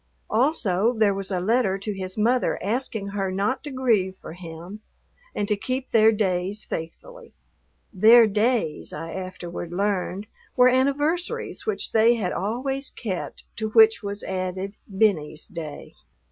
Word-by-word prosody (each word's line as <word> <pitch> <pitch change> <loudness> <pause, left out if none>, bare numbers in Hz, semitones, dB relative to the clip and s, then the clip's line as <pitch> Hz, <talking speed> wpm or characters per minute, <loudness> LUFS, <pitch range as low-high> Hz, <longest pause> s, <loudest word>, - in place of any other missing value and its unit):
Also 225 - +2
there 210 -2 +4
was 195 0 -4
a 185 -3 -1
letter 200 0 +1
to 205 +2 -4
his 185 0 -5
mother 240 +4 +2
asking 220 -2 -2
her 195 -2 -2
not 200 +8 -1
to 295 - -6
grieve 225 -8 +1
for - - -10
him 175 +4 -9 0.5
and 205 - -1
to 210 - +2
keep 255 +5 -4
their 220 -1 +6
days 195 -1 -1
faithfully. 475 - -8 0.6
"Their 225 +4 +7
days," 215 -5 0
I 165 0 -6
afterward 175 -2 -6
learned, 195 +1 -1 0.3
were 250 -1 +6
anniversaries 295 - 0
which 430 -2 -2
they 225 +2 +5
had 195 -6 -2
always 260 +8 -2
kept, 190 -7 -5
to 220 0 -2
which 220 0 +6
was 200 0 -5
added 185 +1 -3 0.2
"Benny's 190 -7 +1
day." 155 -4 -8
210 Hz, 145 wpm, -24 LUFS, 185-240 Hz, 0.6 s, Their